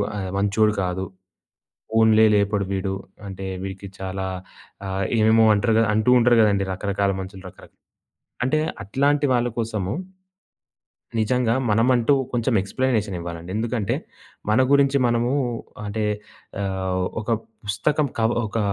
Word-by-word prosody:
ఆహ్, 95 -2 -3
మంచోడు 105 +2 +2
కాదు. 90 +1 -2 0.8
ఫోన్లే 110 0 +5
లేపడు 100 0 +1
వీడు. 95 0 -1 0.3
అంటే, 95 0 -7 0.2
వీడికి 95 +1 -6
చాలా 95 0 -4 0.6
ఆహ్, 95 0 -2
ఏమేమో 110 +1 +5
అంటారు 110 +2 +1
గ - - +5
అంటూ 110 +3 +3
ఉంటారు 120 0 +4
గదండీ! 100 -2 +3
రకరకాల 100 +1 -1
మనుషులు 95 0 -8
రకరక్ - - -18 0.7
అంటే 155 +5 +1 0.2
అట్లాంటి 140 +7 +1
వాళ్ళ 120 0 +2
కోసము 110 -5 -2 1.3
నిజంగా 115 +1 +1 0.2
మనమంటూ 120 +4 +3 0.2
కొంచెం 120 +1 0
ఎక్స్‌ప్లనేషనివ్వాలండి. 95 -8 -2
ఎందుకంటే 115 -2 -1 0.6
మన 110 - +4
గురించి 140 0 +4
మనము 120 +1 +1 0.6
అంటే 105 +1 -2 0.6
ఆహ్, 95 -1 -1 0.2
ఒక - - -14 0.4
పుస్తకం 140 +8 0
కవ 110 +1 +3 0.2
ఒక 115 - -3
105 Hz, 120 wpm, -23 LUFS, 95-120 Hz, 1.3 s, ఫోన్లే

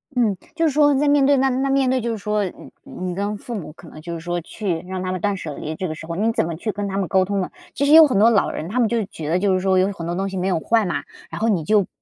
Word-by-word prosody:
嗯。 230 -5 +2 0.2
就 330 -1 +2
是 - - +1
说 290 0 +4
在 290 +2 +2
面 285 -1 +4
对 280 0 +4
那 265 +1 +3
那 265 +2 0
面 270 -1 +2
对 260 0 +1
就 235 0 -2
是 225 - -3
说 210 0 -1
你 180 - -9
你 180 -1 -5
跟 205 +2 -2
父 240 +3 -7
母 185 -7 -6
可 170 +1 -15
能 155 - -12
就 170 +2 -6
是 165 - -5
说 175 +1 -3
去 180 0 -3
让 185 0 -4
他 185 - -2
们 185 -2 -4
断 205 +1 0
舍 155 -4 -6
离， 155 +3 -5
这 185 +3 -3
个 155 - -5
时 160 - -9
候 170 - -4
你 215 +5 +1
怎 - - +1
么 165 0 -4
去 215 +7 -3
跟 205 +1 -4
他 195 - -3
们 195 -2 -1
沟 185 +3 +3
通 200 0 -1
呢？ 185 - -3 0.2
其 280 - 0
实 290 - +4
有 320 -1 +10
很 255 - 0
多 220 +3 +6
老 215 -4 +2
人， 160 - -5
他 240 +5 -1
们 235 - +4
就 235 - 0
是 220 - -1
觉 155 -6 -6
得 175 +3 +2
就 195 0 +2
是 185 - +2
说 190 0 +2
有 190 +2 +2
很 170 -4 -7
多 170 +1 -2
东 195 +2 -2
西 190 - -5
没 180 - -1
有 180 -4 +1
坏 225 +5 +2
嘛， 175 - -2 0.3
然 - - -6
后 225 - +2
你 180 -6 +1
就 210 +6 +3
不 - - -13
200 Hz, 375 characters per minute, -21 LUFS, 180-235 Hz, 0.3 s, 有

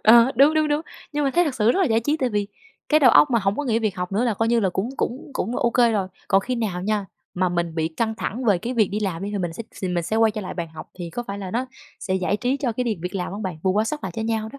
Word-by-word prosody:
Ờ, 235 +4 +7
đúng, 285 +5 +6
đúng, 310 -1 +2
đúng. 295 0 +1 0.3
Nhưng 295 0 0
mà 275 - +2
thấy 350 +6 +3
thật 295 -5 -2
sự 225 -1 +3
rất 385 - +1
là 375 - +4
giải 225 -3 +2
trí, 295 +6 0
tại 260 -4 0
vì 205 -2 -1 0.4
cái 305 0 +4
đầu 255 -5 +7
óc 295 - +6
mà 235 - +3
hổng 195 +2 +1
có 290 - -2
nghĩ 230 -3 +1
việc 215 -4 -1
học 180 +1 -4
nữa 220 +5 +1
là 230 -4 +1
coi 225 +3 0
như 235 0 +3
là 195 - +2
cũng 195 +7 -2
cũng 255 +4 -3
cũng 235 +1 -2
OK 235 -1 +3
rồi. 195 -3 0 0.2
Còn 195 - +4
khi 250 +5 -3
nào 205 -7 -2
nha, 205 0 -1 0.3
mà 185 0 +1
mình 170 -2 -2
bị 160 -1 0
căng 220 +7 -2
thẳng 235 +3 -4
về 205 -6 +4
cái 240 +8 -4
việc 215 -5 +3
đi 210 +2 -3
làm 190 -4 -2
đi 200 - -3
thì 205 - -2
mình 175 -3 -2
sẽ 230 - -6
s - - -13
thì 185 - 0
mình 175 -1 0
sẽ 220 - -1
quay 225 -1 +4
trở 215 - -5
lại 190 - -6
bàn 170 -2 -4
học 160 0 -11
thì 175 -2 -6
có 240 - -4
phải 200 -3 -6
là 190 -2 -5
nó 245 +6 -1 0.3
sẽ 190 - -2
giải 190 +2 0
trí 255 +5 0
cho 255 -4 -1
cái 250 +3 -2
điềm 215 -7 -2
việc 180 +2 -5
làm 180 -1 -3
hông 210 +2 -5
bạn? 185 -4 -4
Bù 190 - +2
quá 210 +3 +2
sớt 300 +6 -3
lại - - -4
cho 225 - -1
nhau 220 -1 -1
đó. 280 - -10
220 Hz, 340 wpm, -23 LUFS, 190-245 Hz, 0.4 s, Ờ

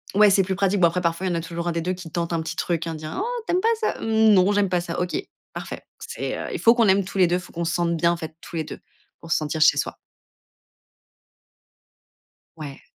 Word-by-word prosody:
ouais, 210 0 +7
c'est 195 0 +4
plus 190 0 -2
pratique. 195 0 +1
Bon, 170 - +6
après, 180 +2 -1
parfois, 170 +2 -1
il 185 - +1
y - - -1
en - - 0
a 165 - -1
toujours 170 +1 -5
1 - - +1
des 165 - -1
2 180 +2 -1
qui 180 -2 -9
tente 170 0 -2
un 165 - 0
petit 165 +1 -5
truc: 170 -1 -1
«Hein, 165 - -3
dit! 155 0 -8
Hein, 260 - -4
oh, 485 0 -3
tu - - 0
aimes 365 - +2
pas 455 +3 +3
ça?» 435 - -1
«Mmh, 220 -1 +4
non, 190 +1 +5
j'aime 200 -2 +2
pas 180 -1 +1
ça», 170 0 -4
«OK, 180 - -4 0.4
parfait». - - -6 0.2
C'est - - -5
heu - - -5
Il - - -3
faut 230 - +6
qu'on 230 -3 +4
aime 195 +1 +4
tous 195 - -7
les 180 -2 +5
2 180 +1 +1
faut 180 - -13
qu'on 170 0 -3
se 165 - -1
sente 170 -1 +1
bien, 170 +1 +3
en 170 - -1
fait, 160 -1 -7
tous - - -10
les 160 - -1
2 - - -9 0.4
pour 165 - -10
se - - +4
sentir 155 +1 -3
chez - - +6
soi. - - -2 2.6
Ouais. 145 -3 -8
175 Hz, 280 wpm, -23 LUFS, 165-195 Hz, 2.6 s, ouais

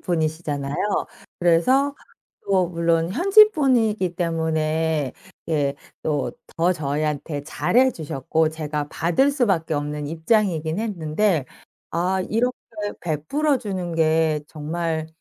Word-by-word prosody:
분이시잖아요 155 -4 -2 0.6
그래서 255 +12 +3 0.5
또 185 -3 +2
물론 170 0 +1
현지분이기 260 - +4
때문에 160 -3 0 0.4
예 145 -3 +1 0.3
또 150 -2 -1 0.4
저희한테 150 -1 -2
잘 190 - -1
해 260 +1 +6
주셨고 155 +1 -1
제가 150 -2 -4
받을 175 - +2
수밖에 195 - +1
없는 145 0 -3
입장이긴 165 -1 0
했는데 175 - 0 0.4
'아 185 +3 0
이렇게 245 +3 +1 0.5
베풀어 255 - 0
주는 185 -5 -4
게 160 -1 +2
정말 160 +1 -3
165 Hz, 235 characters per minute, -23 LUFS, 155-200 Hz, 0.6 s, 해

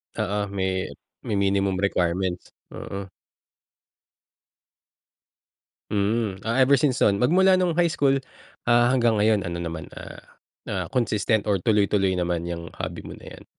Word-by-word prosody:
Oo 100 +1 -1
may 95 -1 -2 0.4
may 105 - -1
minimum 100 -1 +1
requirements? 90 -1 -1 0.2
Mm. 100 0 -7 2.8
Hmm. 105 0 0
Ah, 115 +4 0
ever 135 +2 +6
since 130 -1 +1
nun 100 - +4
magmula 185 - +4
nung 180 -2 +1
high 170 +1 +2
school, 140 -4 +2 0.5
ah, 120 0 +4
hanggang 120 -3 +3
ngayon 105 -2 +2
ano 85 - -4
naman 80 -1 -6
ah, - - -9 0.5
na - - -3 0.2
consistent 110 -3 0
or 100 -3 0
tuloy-tuloy 100 -3 +2
naman 90 -2 -1
iyang 85 -1 -5
hobby - - -5
mo - - -8
na - - -16
iyan? - - -13
100 Hz, 135 wpm, -24 LUFS, 95-120 Hz, 2.8 s, ever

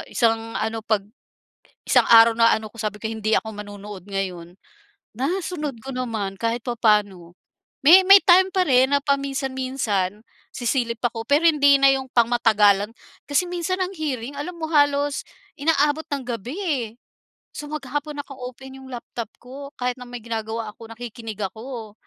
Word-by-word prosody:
isang 225 -1 0
ano 225 0 -2
pag 215 -2 0 0.8
isang - - +4
araw 230 0 +8
na 230 0 +5
ano 220 0 -7
ko - - -18
sabi 210 -1 -3
ko, - - -2
"Hindi 220 0 -1
ako 220 - -2
manonood 205 -2 -9
ngayon." 180 -3 -5 0.6
Nasunod 300 - -3
ko 270 - -6
naman 220 -6 -3
kahit 230 +1 -1
papaano. 210 -7 0 0.5
May 370 +5 +9
may 390 +1 +9
time 375 +1 +6
pa 375 - +2
rin 260 +1 +4
na 285 - +4
paminsan-minsan 265 -8 -1 0.3
sisilip 235 -2 -1
ako 225 -1 -1
pero 300 +4 +4
hindi 285 -2 +5
na 275 - +7
yung 265 -1 -3
pang 235 -1 +4
matagalan. 210 -3 +3 0.4
Kasi 290 +5 +1
minsan 355 +1 -2
ang 365 - 0
hearing 280 -4 -4
alam 325 +5 -5
mo 320 -1 -4
halos 290 -1 +2 0.3
inaabot 295 +1 +1
ng 285 -1 -2
gabi 235 +2 -5
eh. 285 - -1 0.7
So 295 0 -8
maghapon 290 0 -4
naka-open 265 -1 -9
yung 265 - -12
laptop 235 -2 -6
ko. 275 +3 -10
Kahit 250 0 0
na 250 - -7
may 245 - -6
ginagawa 225 -1 -4
ako, 225 +1 -13
nakikinig 225 -2 -8
ako. 220 +2 -6
245 Hz, 160 wpm, -23 LUFS, 220-285 Hz, 0.8 s, May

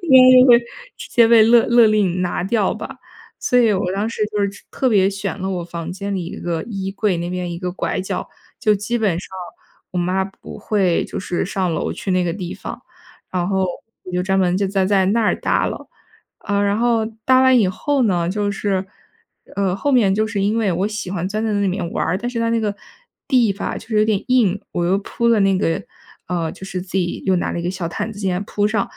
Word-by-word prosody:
应 260 -5 +7
该 255 0 +8
就 255 - +6
会 235 - +8 0.4
直 - - -9
接 235 -2 +5
被 225 -1 +7
勒 230 +1 +5
勒 235 -1 +6
令 200 -4 +1
拿 175 - -1
掉 205 0 +1
吧。 - - -7 0.4
所 250 - +2
以 230 -3 +4
我 185 -2 -1
当 205 +3 -1
时 230 - -3
就 210 - -3
是 200 0 -2
特 260 - 0
别 195 -5 +4
选 195 0 -4
了 190 - -2
我 180 -2 -3
房 170 0 -6
间 200 +2 -4
里 185 -3 -3
一 170 - -7
个 170 -2 -3
衣 195 -4 -4
柜 205 -4 0
那 170 +1 -3
边 180 -1 -3
一 170 - -5
个 180 0 -4
拐 - - -2
角， 185 - -4 0.3
就 215 -1 +3
基 210 +4 -2
本 195 -6 +1
上 - - -8 0.6
我 180 - -3
妈 185 +2 0
不 195 - -11
会 190 -5 +1
就 - - -6
是 180 -2 -2
上 185 -2 -1
楼 - - -2
去 195 - -5
那 185 0 +2
个 170 - -1
地 180 -1 -5
方。 - - -8 0.5
然 180 0 -1
后， 190 -1 +1 0.4
我 185 - -8
就 180 0 0
专 190 +1 +1
门 180 -1 +2
就 200 0 +1
在 195 -1 +1
在 190 -1 +2
那 225 +4 +2
儿 210 - +2
搭 - - +1
了。 - - -6 0.5
啊， 200 0 -1
然 200 0 +1
后 230 -2 +2 0.2
搭 260 0 +5
完 260 -1 +5
以 200 -5 +3
后 275 +8 0
呢， 175 -6 +1
就 205 +1 -1
是， 195 -1 -1 0.7
呃， 195 -2 +1
后 285 +8 -1
面 210 -7 +4
就 215 +2 +1
是 215 -2 -3
因 210 +3 +1
为 215 -4 +1
我 185 +4 0
喜 210 -3 -5
欢 180 -2 -2
钻 215 +2 -2
在 220 - 0
那 205 - 0
里 200 - +1
面 180 -2 -2
玩 - - -1
儿， 180 +4 0
但 240 +3 -3
是 245 - -4
它 230 - +1
那 230 0 +1
个 205 -2 -1 0.5
地 240 -7 +3
吧 200 - -4
就 225 - -14
是 215 -2 +1
有 215 - +4
点 215 -2 0
硬， 215 -7 +2
我 175 - -1
又 190 +3 +2
铺 235 +3 -1
了 230 - +4
那 195 -1 +3
个 165 -4 0 0.4
呃， 170 -3 -2
就 - - -10
是 185 -2 -4
自 185 - -14
己 175 -1 -2
又 190 -1 +3
拿 - - -1
了 170 - -3
一 - - -6
个 175 - -1
小 180 -3 -4
毯 210 +6 -4
子 205 - -11
进 195 -2 -1
来 180 - -1
铺 205 0 -1
上。 215 -2 +1
195 Hz, 270 characters per minute, -20 LUFS, 185-220 Hz, 0.7 s, 该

